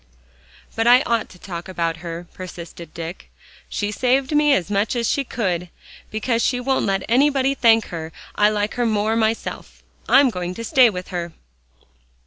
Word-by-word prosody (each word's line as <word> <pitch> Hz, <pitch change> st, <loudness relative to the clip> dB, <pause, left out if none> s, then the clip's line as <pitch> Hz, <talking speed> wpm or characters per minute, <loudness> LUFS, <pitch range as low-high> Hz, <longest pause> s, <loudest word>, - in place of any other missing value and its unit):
"But 225 Hz, +1 st, +1 dB
I 250 Hz, +2 st, +7 dB
ought 230 Hz, -1 st, 0 dB
to 180 Hz, -, -15 dB
talk 175 Hz, -1 st, -7 dB
about 170 Hz, -3 st, -2 dB
her," 170 Hz, +1 st, -7 dB
persisted 170 Hz, -3 st, -9 dB
Dick. 165 Hz, +2 st, -8 dB, 0.4 s
"She 205 Hz, 0 st, -2 dB
saved 260 Hz, +6 st, +1 dB
me 295 Hz, 0 st, +4 dB
as 200 Hz, -6 st, +1 dB
much 205 Hz, +4 st, 0 dB
as 235 Hz, -2 st, 0 dB
she 280 Hz, -, +1 dB
could. 180 Hz, -8 st, -2 dB, 0.4 s
Because 230 Hz, +2 st, -1 dB
she 250 Hz, +2 st, +1 dB
won't 265 Hz, +1 st, 0 dB
let 195 Hz, -1 st, 0 dB
anybody 270 Hz, +2 st, +3 dB
thank 225 Hz, -4 st, +3 dB
her, 165 Hz, -2 st, -6 dB, 0.2 s
I 210 Hz, 0 st, +4 dB
like 210 Hz, 0 st, -1 dB
her 245 Hz, -1 st, 0 dB
more 215 Hz, 0 st, +1 dB
myself. 225 Hz, 0 st, -2 dB, 0.3 s
I'm 270 Hz, -2 st, +6 dB
going 180 Hz, -2 st, -4 dB
to 230 Hz, -, -6 dB
stay 245 Hz, +1 st, +5 dB
with 180 Hz, -3 st, -6 dB
her." 175 Hz, -3 st, -4 dB
215 Hz, 170 wpm, -21 LUFS, 180-245 Hz, 0.4 s, I